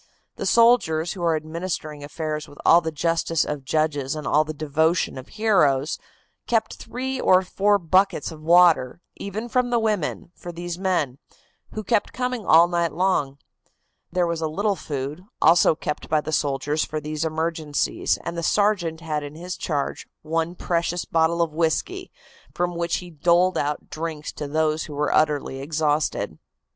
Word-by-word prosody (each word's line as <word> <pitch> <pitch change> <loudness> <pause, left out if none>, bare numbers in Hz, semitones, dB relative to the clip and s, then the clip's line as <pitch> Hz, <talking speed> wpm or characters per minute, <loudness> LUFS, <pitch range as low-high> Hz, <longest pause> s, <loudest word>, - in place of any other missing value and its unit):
The - - -3
soldiers, 230 -9 +4
who 190 - -8
are 165 -2 +2
administering 155 -1 -4
affairs 155 +1 -4
with 145 - -15
all 170 - +7
the 160 -1 -3
justice 165 +1 0
of 150 -2 -4
judges 145 -1 0
and 155 - -6
all 150 +1 +3
the 155 - -5
devotion 155 +3 0
of 130 0 -8
heroes, 160 -10 +2 0.5
kept 225 -2 0
three 260 +2 -4
or 185 0 +5
four 205 +2 +2
buckets 185 -1 +1
of 155 -1 -11
water, 170 -5 +4 0.2
even 210 +4 -5
from 250 +1 +1
the 240 - +2
women, 210 -7 -1
for 175 - -8
these 175 +1 -6
men, 165 -9 0 0.5
who 215 - -4
kept 210 +1 0
coming 250 -4 -3
all 165 +2 +7
night 170 -2 0
long. 160 -6 0 0.7
There 180 0 +1
was 170 -1 -2
a 160 - 0
little 200 +6 0
food, 145 +1 -5 0.2
also 165 -1 +5
kept 150 0 -5
by 155 - +3
the 150 +1 -5
soldiers 145 +1 0
for 155 - -3
these 150 +1 -4
emergencies, 160 -2 -1
and 170 - -4
the 170 - -3
sergeant 175 -3 +1
had 155 -2 -2
in 145 +1 -8
his 180 +3 -6
charge 145 -4 -3 0.2
one 165 +2 -1
precious 175 0 -1
bottle 165 +1 +2
of 160 -2 -4
whisky, 170 - -1 0.4
from 175 0 0
which 170 0 -1
he 175 - -11
doled 175 +4 +3
out 150 -1 -2
drinks 155 -1 -5
to 145 - -6
those 155 +1 0
who 150 - -8
were 150 +1 0
utterly 145 -3 +1
exhausted. 150 +1 -1
165 Hz, 170 wpm, -23 LUFS, 150-180 Hz, 0.7 s, all